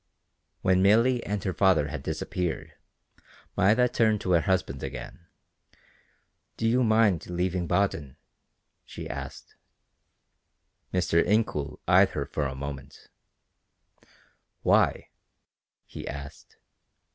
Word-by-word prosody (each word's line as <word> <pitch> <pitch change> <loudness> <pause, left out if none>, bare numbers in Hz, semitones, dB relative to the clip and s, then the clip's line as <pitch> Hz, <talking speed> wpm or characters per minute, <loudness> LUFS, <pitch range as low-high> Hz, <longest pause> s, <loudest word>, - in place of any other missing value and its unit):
When 95 0 +3
Milly 115 +5 +4
and 105 -2 -2
her 95 - -1
father 85 -5 +3
had - - -5
disappeared, 90 -3 -3 0.8
Maida 110 +6 +4
turned 110 -3 +2
to 90 - -2
her 85 -2 +4
husband 95 -8 -1
again. 85 - -8 1.3
"Do 115 - 0
you 125 +3 +3
mind 110 -7 +2
leaving 90 0 -1
Baden?" 80 -7 -1 0.7
she - - -8
asked. - - -8 1.4
Mr. 85 -2 +2
Incoul 105 -10 0
eyed - - +6
her - - -3 0.2
a 70 -2 -2
moment. 70 0 -8 1.5
"Why?" - - +2 0.8
he - - -9
asked. 70 0 -9
95 Hz, 100 wpm, -27 LUFS, 80-105 Hz, 1.5 s, eyed